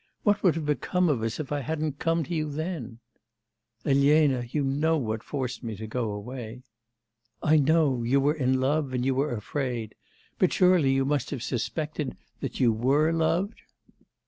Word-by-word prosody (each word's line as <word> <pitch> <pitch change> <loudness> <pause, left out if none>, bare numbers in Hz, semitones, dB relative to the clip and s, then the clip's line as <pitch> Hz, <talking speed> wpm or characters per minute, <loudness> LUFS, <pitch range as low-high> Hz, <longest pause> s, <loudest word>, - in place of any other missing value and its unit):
What 205 0 +2
would 175 -6 +3
have 160 -2 -3
become 175 +4 +1
of 130 -7 +1
us, 115 +4 -2
if 150 -2 -5
I 145 - 0
hadn't 150 0 -3
come 165 0 +1
to 175 - -5
you 155 -2 -1
then!' 145 -6 -4 0.9
'Elena, 140 -2 +3
you 145 +3 -1
know 150 +4 +1
what 110 -5 -2
forced 130 -1 -4
me 115 -3 -5
to 110 +2 -7
go 115 +1 -2
away.' 115 +3 -7 0.8
'I 155 +1 +5
know; 145 -3 +3
you 125 +4 +2
were 145 +2 +3
in 130 -4 +1
love, 140 0 0
and 125 0 -1
you 135 - +2
were 135 -1 0
afraid. 120 0 -3 0.5
But - - +3
surely 180 -7 +4
you 135 0 +2
must 145 +1 0
have 130 -5 -4
suspected 150 +3 -3 0.2
that - - -5
you 120 -3 +4
were 140 +8 +2
loved? 165 +6 0
140 Hz, 175 wpm, -27 LUFS, 125-155 Hz, 0.9 s, I